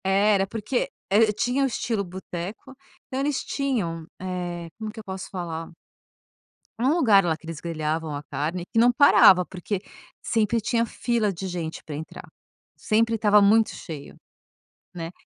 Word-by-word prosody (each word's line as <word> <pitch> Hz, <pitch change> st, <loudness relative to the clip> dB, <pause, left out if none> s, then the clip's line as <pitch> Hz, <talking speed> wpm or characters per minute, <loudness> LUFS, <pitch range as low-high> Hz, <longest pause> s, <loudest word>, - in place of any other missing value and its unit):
É, 195 Hz, +2 st, +3 dB
era 195 Hz, -1 st, +2 dB
porque 225 Hz, +4 st, -2 dB, 0.2 s
e -, -, +3 dB
e -, -, 0 dB
tinha 245 Hz, +6 st, 0 dB
o -, -, +3 dB
estilo 225 Hz, -4 st, -2 dB
"boteco", 190 Hz, +6 st, -7 dB, 0.3 s
então 260 Hz, -, -4 dB
eles 280 Hz, 0 st, 0 dB
tinham, 200 Hz, -, -2 dB
eh, 175 Hz, -2 st, -4 dB
como 215 Hz, -1 st, -4 dB
que 225 Hz, -, -10 dB
eu -, -, -8 dB
posso 190 Hz, -1 st, -6 dB
falar 165 Hz, -3 st, -5 dB, 1.1 s
um 250 Hz, +3 st, +2 dB
lugar 230 Hz, -, +5 dB
lá, 165 Hz, -2 st, +1 dB
que 160 Hz, -, -18 dB
eles 165 Hz, -2 st, -6 dB
grelhavam 160 Hz, -2 st, -3 dB
a 145 Hz, -, -6 dB
carne 155 Hz, +5 st, -3 dB
e 225 Hz, -, +3 dB
não 240 Hz, +2 st, +6 dB
parava 195 Hz, -8 st, +7 dB
porque, 185 Hz, +2 st, -4 dB, 0.4 s
sempre 225 Hz, 0 st, +1 dB
tinha 230 Hz, +2 st, +1 dB
fila 230 Hz, -3 st, 0 dB
de 190 Hz, +2 st, -5 dB
gente 170 Hz, -3 st, -5 dB
pra 150 Hz, -, -7 dB
entrar, 155 Hz, +2 st, -8 dB, 0.5 s
sempre 225 Hz, +1 st, +2 dB
estava 210 Hz, -1 st, +5 dB
muito 215 Hz, +2 st, +5 dB
cheio, 150 Hz, -4 st, -8 dB, 0.8 s
né. 165 Hz, -1 st, -5 dB
195 Hz, 165 wpm, -25 LUFS, 170-225 Hz, 1.1 s, parava